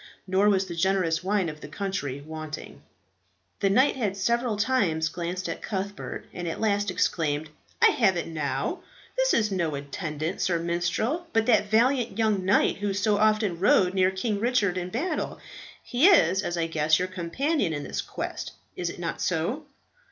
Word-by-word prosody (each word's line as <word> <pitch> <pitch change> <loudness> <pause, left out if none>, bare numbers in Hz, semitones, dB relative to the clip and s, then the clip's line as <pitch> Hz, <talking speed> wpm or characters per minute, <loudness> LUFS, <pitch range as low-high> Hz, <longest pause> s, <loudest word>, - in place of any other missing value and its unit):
Nor 190 +2 +3
was 195 -1 +2
the 175 - -6
generous 170 -1 +1
wine 195 -1 +1
of 150 -1 -7
the - - -7
country 185 -9 -4
wanting. 155 0 -8 0.8
The 195 - +2
knight 260 +8 +4
had 205 -7 -2
several 235 +2 0
times 200 -9 +1
glanced 175 +2 -4
at 165 - -5
Cuthbert, 200 0 -5
and 175 -1 -5
at 165 - -4
last 205 -2 +1
exclaimed, 155 -4 0 0.3
"I - - +9
have 195 -7 +2
it 170 - -2
now. 155 -3 -2 0.4
This - - +2
is 215 -2 +1
no 170 -6 -1
attendant, 155 +4 -4
sir 175 -2 +2
minstrel, 175 - -1
but 225 0 +3
that 220 -3 +3
valiant 240 +2 +2
young 215 -4 +1
knight 190 +2 +3
who 200 -1 -2
so 205 0 +2
often 215 -5 +2
rode 185 -1 +4
near 185 -1 +3
King 200 +2 -2
Richard 220 -5 +1
in 180 -1 -3
battle. 275 - -2 0.4
He 255 +8 +3
is, 330 - +5
as 175 -3 -3
I 165 - +1
guess, 155 -1 +2
your 180 - -1
companion 185 - -1
in 145 -2 -3
this - - -3
quest; - - -5 0.2
is 175 -1 -2
it - - -8
not 170 -1 -4
so?" 195 - -1
190 Hz, 175 wpm, -26 LUFS, 170-215 Hz, 0.8 s, I